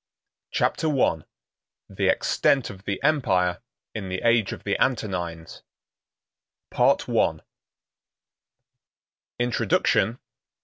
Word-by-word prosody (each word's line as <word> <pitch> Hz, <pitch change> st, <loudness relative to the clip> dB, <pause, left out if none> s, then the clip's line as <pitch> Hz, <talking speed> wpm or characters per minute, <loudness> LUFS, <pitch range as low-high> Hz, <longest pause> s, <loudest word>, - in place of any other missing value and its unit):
Chapter 160 Hz, -, 0 dB
I: 80 Hz, -9 st, +1 dB, 0.6 s
The -, -, -2 dB
Extent 135 Hz, -5 st, +2 dB
Of 95 Hz, 0 st, -14 dB
The 100 Hz, -, -2 dB
Empire 95 Hz, -, +1 dB, 0.3 s
In 100 Hz, -4 st, -5 dB
The 95 Hz, 0 st, -3 dB
Age 115 Hz, -3 st, +3 dB
Of -, -, -8 dB
The 100 Hz, -, -1 dB
Antonines—Part 90 Hz, -9 st, -3 dB
I. -, -, +1 dB, 2.0 s
Introduction. 120 Hz, -1 st, +1 dB
100 Hz, 85 wpm, -24 LUFS, 90-120 Hz, 2.0 s, Age